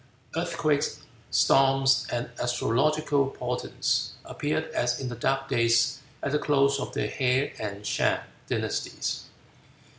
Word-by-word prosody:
Earthquakes, 145 -2 0 0.3
storms, 135 0 +4
and 120 0 -2
astrological 140 +4 +1
portents - - -1
appeared 155 +2 -1
as 120 0 0
in 130 - -3
the 120 - -5
dark 135 +3 0
days 115 -1 +3 0.2
at 140 - -1
the 150 - +2
close 140 -2 +3
of - - -4
the - - 0
Hea 130 +1 +1
and 105 -1 -5
Shang - - +1 0.3
dynasties. - - -2
135 Hz, 120 wpm, -27 LUFS, 120-140 Hz, 0.3 s, storms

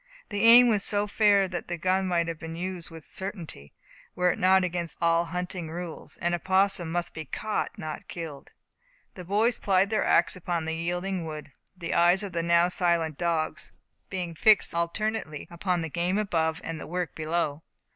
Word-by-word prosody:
The 205 -2 -2
aim 240 +2 +9
was 210 -4 +2
so 205 0 +2
fair 205 -2 +3
that 180 -2 -5
the 175 - -3
gun 185 +3 +1
might 170 -2 +1
have 165 -1 -5
been 165 0 -7
used 180 0 -4
with 165 -2 -11
certainty, 175 - -7 0.4
were 180 0 +3
it - - -5
not 190 +1 +5
against 175 -2 -3
all 170 0 +3
hunting 180 -1 -4
rule; 170 0 -7
an 175 0 0
opossum 190 -1 +1
must 175 0 -2
be 160 - -6
caught, 215 +9 -3
not 155 -1 -6
killed. 160 -5 -7 0.6
The 180 - -9
boys 215 +6 +1
plied 195 +1 +2
their 215 - +2
ax 170 - +3
upon 175 -2 -3
the 160 - -2
yielding 175 +2 -2
wood, 155 -2 -7 0.3
the 170 -2 -4
eyes 175 +4 +4
of 200 - -4
the 170 -1 -1
now 170 +1 +4
silent 170 -4 0
dogs 165 -3 -1 0.4
being 180 -3 -4
fixed 210 +6 +4
alternately 170 -1 -2
upon 175 0 -1
the 165 - -3
game 175 +4 0
above 165 -5 0
and 165 -1 -5
the - - -8
work 180 0 -3
below. 155 -1 -2
175 Hz, 185 wpm, -27 LUFS, 165-190 Hz, 0.6 s, aim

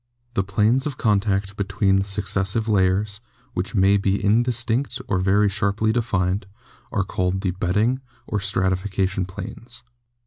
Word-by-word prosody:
The 95 - +1
planes 110 +8 +2
of 140 -3 -5
contact 100 -2 +1
between 100 -1 +1
the 95 - +1
successive 100 +2 -1
layers, 100 +1 +1 0.3
which 95 +6 -3
may 100 0 +5
be 100 0 +1
indistinct 120 +4 +1
or 95 - +1
very 100 +3 +3
sharply 105 +2 +1
defined, 95 -4 0 0.4
are 100 - +1
called 90 0 -1
the 95 -2 0
bedding 105 +8 0 0.2
or 105 - -2
stratification 95 0 0
planes." 115 +5 -8
100 Hz, 135 wpm, -23 LUFS, 95-110 Hz, 0.4 s, may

